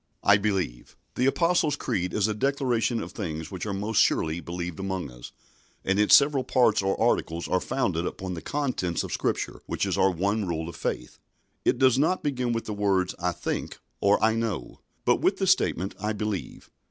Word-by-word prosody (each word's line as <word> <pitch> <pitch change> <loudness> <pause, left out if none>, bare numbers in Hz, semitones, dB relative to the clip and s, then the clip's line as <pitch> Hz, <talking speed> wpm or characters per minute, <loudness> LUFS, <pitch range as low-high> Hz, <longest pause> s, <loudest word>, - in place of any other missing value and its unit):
"I 100 0 +6
believe." 95 - -2 0.2
The 125 - +1
Apostles' 165 0 +2
Creed 90 -9 -2
is 105 -1 +1
a 110 - 0
declaration 120 -2 0
of - - -8
things 80 -6 -5
which 95 +2 -5
are - - -2
most 100 +2 +1
surely 80 +1 +1
believed 85 0 -5
among 95 -7 -3
us, - - -11 0.5
and 95 +2 +1
its 105 - +7
several 140 -2 +4
parts 120 -6 +3
or 95 0 -1
articles 85 +1 0
are 95 - +2
founded 90 -10 -1
upon 95 -1 -5
the 85 - -6
contents 130 - -1
of - - -5
Scripture, - - -2
which - - -1
is - - -1
our - - +5
one 100 +3 0
rule 80 -1 -2
of 85 - -7
faith. - - -4 0.4
It - - +2
does 130 -1 +4
not 160 +6 +1
begin 125 -4 -1
with 115 -1 -2
the 105 - -4
words 100 -3 +1
I 90 +1 0
think - - -4 0.2
or 100 +1 +4
I 110 0 +4
know, 110 - -3 0.3
but - - +4
with - - +2
the 195 - 0
statement 100 - +2
"I 105 +2 -1
believe." 105 -2 -5
100 Hz, 195 wpm, -26 LUFS, 90-120 Hz, 0.5 s, its